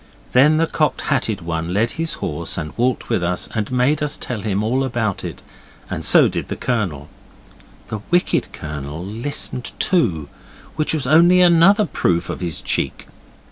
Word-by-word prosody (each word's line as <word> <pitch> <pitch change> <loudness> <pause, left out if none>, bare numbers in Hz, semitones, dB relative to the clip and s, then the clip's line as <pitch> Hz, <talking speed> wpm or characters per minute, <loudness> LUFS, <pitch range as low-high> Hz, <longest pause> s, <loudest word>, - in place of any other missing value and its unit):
Then 150 +5 +5
the 165 - +3
Cocked 155 -1 -1
Hatted 115 -9 -1
One 85 +1 -3
led 115 +3 +1
his 165 0 -2
horse 85 +1 -3
and 75 -1 -5
walked 125 +1 0
with 90 - 0
us 90 +1 -1
and 110 -1 -3
made 130 +5 +1
us 150 -1 0
tell 120 -4 -5
him 105 -1 -1
all 130 +5 0
about 115 -6 -2
it, - - -7 0.5
and - - -3
so - - +6
did - - -4
the - - -4
Colonel. 90 - -2 0.8
The 110 - -4
wicked 175 +1 +1
Colonel 75 +2 -7
listened 120 +4 -2
too, 90 - +1 0.5
which 155 +1 +2
was 145 -4 -2
only 170 +6 +5
another 180 +4 +5
proof 85 - -1
of - - -6
his 85 -4 -3
cheek. - - -2
120 Hz, 170 wpm, -20 LUFS, -, 0.8 s, so